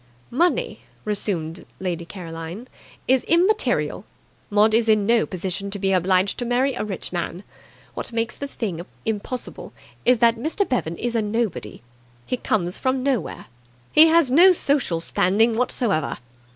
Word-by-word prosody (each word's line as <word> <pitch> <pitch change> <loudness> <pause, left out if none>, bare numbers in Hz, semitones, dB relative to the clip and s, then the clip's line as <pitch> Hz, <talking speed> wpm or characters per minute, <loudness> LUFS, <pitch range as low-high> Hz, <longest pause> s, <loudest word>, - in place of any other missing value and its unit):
"Money," 340 +8 +1 0.3
resumed 185 -5 -2 0.2
Lady 175 -3 -3
Caroline, 170 +4 -8 0.4
"is 260 0 +3
immaterial. 375 +6 +2 0.5
Maud 210 +1 +4
is 225 0 +3
in 215 -2 +4
no 230 +1 +3
position 190 +1 -4
to 200 - -3
be 195 -1 0
obliged 185 +2 +2
to - - -1
marry 250 +3 +1
a - - -3
rich 195 -3 -5
man. 175 +2 -4 0.5
What - - -5
makes 230 0 -2
the 280 - -5
thing 195 -11 -4 0.2
impossible 220 +3 -4 0.3
is 250 0 +4
that 230 0 +3
Mr. 320 - -1
Bevan 170 -10 -2
is 240 0 -2
nobody. 215 - -2 0.4
He 250 - -2
comes 180 -7 0
from 260 0 0
nowhere. 265 -5 -2 0.5
He 315 +2 +8
has 325 -5 +4
no 350 +7 +7
social 275 - +1
standing 215 +7 +2
whatsoever." 225 - 0
220 Hz, 145 wpm, -22 LUFS, 185-250 Hz, 0.5 s, He